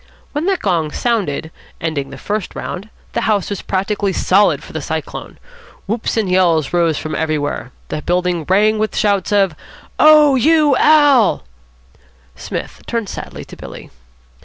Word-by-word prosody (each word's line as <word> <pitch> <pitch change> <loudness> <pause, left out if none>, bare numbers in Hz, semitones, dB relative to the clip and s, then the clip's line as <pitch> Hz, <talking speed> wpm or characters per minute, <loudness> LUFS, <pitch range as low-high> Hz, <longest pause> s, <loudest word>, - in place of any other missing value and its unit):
When 300 +4 -2
the 390 -1 +2
gong 170 - 0
sounded, 180 - -2 0.3
ending 150 -4 -3
the 135 - -9
first 205 +7 -4
round, 195 +4 -6 0.2
the 235 - 0
house 210 -3 0
was 200 - -3
practically 195 +1 -1
solid 195 +3 +2
for - - -12
the - - -3
Cyclone. - - -5 0.5
Whoops 225 +3 -2
and 215 -3 +1
yells 175 -5 +2
rose 170 -3 +2
from 155 - -5
everywhere. 150 -4 -2 0.2
The 155 - -3
building 175 -1 0
rang 210 +3 +3
with 215 0 -1
shouts 200 -3 +1
of, 195 -5 +2 0.4
"Oh, 305 -2 +7
you 300 +2 +4
Al.!" 290 -7 +4 0.9
Psmith - - -6
turned 230 -4 -2
sadly - - -7
to - - -12
Billy. - - -11
200 Hz, 150 wpm, -17 LUFS, 170-230 Hz, 0.9 s, Oh